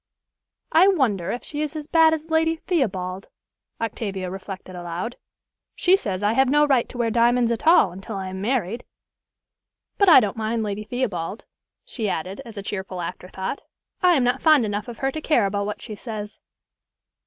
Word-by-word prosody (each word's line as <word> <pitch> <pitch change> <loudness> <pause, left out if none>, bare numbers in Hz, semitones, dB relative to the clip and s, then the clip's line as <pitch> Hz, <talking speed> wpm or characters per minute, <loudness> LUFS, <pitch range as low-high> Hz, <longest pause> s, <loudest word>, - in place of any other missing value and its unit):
"I 350 +4 +6
wonder 245 - +1
if 245 - -3
she 295 -1 -5
is 305 +1 -3
as 305 -1 -5
bad 325 0 +5
as 320 0 -3
Lady 320 0 +3
Theobald," 195 - -2 0.5
Octavia 195 -5 -3
reflected 190 -1 -8
aloud. 175 +6 -5 0.6
"She 370 +1 +4
says 200 - -3
I 210 +2 +3
have 265 +2 +3
no 295 +2 +4
right 270 -5 +2
to 250 - -9
wear 235 -2 0
diamonds 235 +1 +3
at 235 +6 -3
all 325 - +6
until 195 +4 -8
I 190 -1 -4
am 190 0 -6
married. 230 -1 -1 1.2
But 400 -2 +6
I 325 - +10
don't 205 -5 -1
mind 225 +1 -1
Lady 210 0 -3
Theobald," 215 -5 -3 0.4
she 220 -5 -3
added, 185 +3 -4
as 225 -2 -11
a 200 - -5
cheerful 190 -2 -5
afterthought. 185 +6 -5 0.4
"I 360 -2 +5
am 265 - +2
not 245 +2 +1
fond 310 -7 +5
enough 205 +1 -3
of 235 -2 -8
her 270 0 -1
to 310 - -5
care 270 -9 +3
about 200 +1 -1
what 210 - -5
she 220 - -7
says." 210 -1 -6
225 Hz, 185 wpm, -23 LUFS, 195-275 Hz, 1.2 s, I